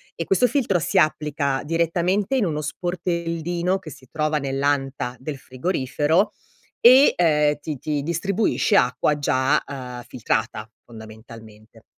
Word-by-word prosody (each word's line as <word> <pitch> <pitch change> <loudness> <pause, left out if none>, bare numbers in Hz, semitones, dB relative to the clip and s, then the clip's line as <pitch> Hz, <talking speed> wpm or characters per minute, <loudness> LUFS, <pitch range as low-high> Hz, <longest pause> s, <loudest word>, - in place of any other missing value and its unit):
e 165 - -3
questo 220 +8 +3
filtro 230 -11 +1
si - - -1
applica 150 -3 +1
direttamente 170 - 0
in 225 - +1
uno 150 -3 -2
sportellino 175 +1 -2
che 165 -6 -11
si 130 +1 -14
trova 155 -1 0
nell'anta 135 -2 -1
del 140 +2 -6
frigorifero 145 +7 0 0.5
e, 260 +4 +7
ehm, 150 -3 +3
ti 150 0 -5
ti 145 +2 -2
distribuisce 200 +6 0
acqua 145 +4 +1
già, 130 -1 +1
uhm, 125 -3 -7
filtrata, 110 -3 -2 0.2
fondamentalmente. 110 0 -14
150 Hz, 125 wpm, -22 LUFS, 130-175 Hz, 0.5 s, e